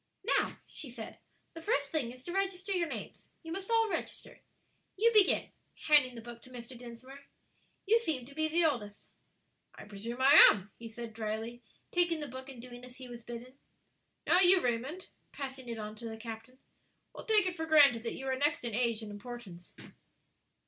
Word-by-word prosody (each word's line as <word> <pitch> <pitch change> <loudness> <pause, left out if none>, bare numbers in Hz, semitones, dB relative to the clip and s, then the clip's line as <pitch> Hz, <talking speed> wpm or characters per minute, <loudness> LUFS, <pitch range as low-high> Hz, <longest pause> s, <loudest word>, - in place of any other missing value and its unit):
"Now," 465 - +1
she 280 - -6
said, 235 -2 -8 0.3
"the 330 - -9
first 450 +9 0
thing 270 -7 -1
is 255 +1 -12
to 345 - -6
register 390 0 -1
your 355 -3 +1
names. - - -8
You 325 - -8
must 385 +4 -5
all 455 -1 +3
register. - - -5 0.6
You 465 +4 +4
begin," 420 -3 +4 0.3
handing 290 -5 +5
the 230 - -9
book 235 0 -10
to 255 - -14
Mr. 245 0 -9
Dinsmore, 250 +3 -11 0.6
"you 450 +3 +5
seem 310 - -2
to 280 - -13
be 315 +2 0
the 330 +2 +2
oldest." 210 -9 -2 0.6
"I - - -10
presume 210 +4 -7
I 270 +2 +6 0.2
am," 200 0 -5
he 230 - -7
said, 230 0 -8
dryly, 220 +2 -4 0.3
taking 345 -2 +2
the 300 - -4
book 260 +1 -8
and 260 -3 -10
doing 245 0 -11
as 250 0 -11
he 255 -1 -10
was 240 -1 -9
bidden. 240 +3 -9 0.7
"Now, 355 - +5
you, 375 0 +8
Raymond," 255 +7 -2 0.2
passing 265 -3 -7
it 230 - -4
on 215 0 -6
to 230 +1 -7
the 220 - -7
captain, 225 +2 -9 0.6
"we'll - - -10
take 430 -3 +5
it 365 -1 -2
for 320 -2 -4
granted 285 -7 +6
that 230 - -4
you 270 - -7
are 265 -1 0
next 290 +2 0
in 235 -2 -3
age 230 -1 0
and 210 - -7
importance." 205 -5 -10
255 Hz, 195 wpm, -32 LUFS, 235-320 Hz, 0.7 s, you